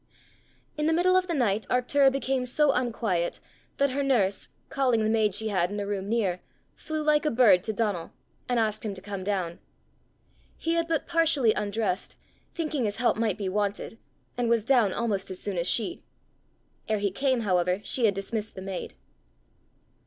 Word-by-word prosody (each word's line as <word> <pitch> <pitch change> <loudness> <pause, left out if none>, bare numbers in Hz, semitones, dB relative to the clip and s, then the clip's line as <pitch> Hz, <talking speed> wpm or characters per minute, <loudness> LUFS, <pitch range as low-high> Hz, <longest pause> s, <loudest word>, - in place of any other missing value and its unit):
In 300 - +1
the 320 - +3
middle 360 +3 +3
of 370 0 +3
the 340 - -1
night 220 -5 0
Arctura 270 +2 +3
became 265 -1 -1
so 295 +3 +3
unquiet, 225 -9 -1 0.4
that 280 -1 +2
her 280 +2 -1
nurse, 220 -8 +1 0.2
calling 250 -5 +1
the 215 - +1
maid 215 -3 +2
she 220 +1 0
had 180 -4 +1
in 205 +1 -4
a 200 - -2
room 200 -1 -3
near, 200 -6 0 0.3
flew 310 -1 -4
like 300 -1 +3
a 305 - +2
bird 225 -8 +5
to 220 - -2
Donal, 205 -6 -2 0.4
and 245 -1 +2
asked 215 -1 0
him 210 -3 -3
to 185 - -10
come 200 -2 -5
down. 185 -4 -2 1.0
He 330 - -1
had 335 0 +1
but 325 -3 0
partially 325 -9 +3
undressed, 205 -2 -2 0.4
thinking 305 -7 -1
his 205 -1 -1
help 240 +1 +2
might 220 -4 0
be 200 -2 -3
wanted, 205 +3 -2 0.4
and 240 -1 +1
was 230 -2 +2
down 240 -6 +4
almost 200 -3 -1
as 185 -1 -6
soon 200 -2 -4
as 170 - +1
she. 345 +9 -1 0.9
Ere 215 - +2
he 200 -1 0
came, 260 +3 +1
however, 180 -2 +1
she 245 - 0
had 205 -3 +3
dismissed 210 +2 -4
the 190 - -7
maid. 190 -2 -5
220 Hz, 185 wpm, -27 LUFS, 200-270 Hz, 1.0 s, bird